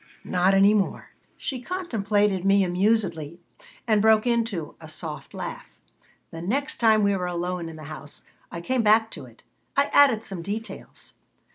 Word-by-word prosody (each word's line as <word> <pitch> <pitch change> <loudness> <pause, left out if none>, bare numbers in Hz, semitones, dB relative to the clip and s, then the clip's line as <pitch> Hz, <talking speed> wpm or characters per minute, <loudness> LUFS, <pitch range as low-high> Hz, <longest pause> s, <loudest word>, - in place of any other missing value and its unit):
Not 185 +2 +2
any 200 +2 +6
more." 205 -3 -1 0.3
She 260 -3 -4
contemplated 210 - 0
me 195 0 +4
amusedly 180 -4 0 0.5
and 215 -2 +3
broke 220 +1 +4
into 230 -9 -1
a 160 - -10
soft 155 -1 -7
laugh - - -8 0.5
The 165 - -7
next 270 - -2
time 220 -2 +4
we 200 0 +2
were 180 -1 -2
alone 175 -1 -3
in 160 - -10
the 155 - -10
house 150 -1 -9 0.3
I 170 - -6
came 255 +7 0
back 220 +1 +4
to - - -9
it. - - -20 0.3
I 280 - +2
added 260 -6 +5
some 190 -5 -5
details. 210 +5 -7
200 Hz, 160 wpm, -25 LUFS, 175-225 Hz, 0.5 s, any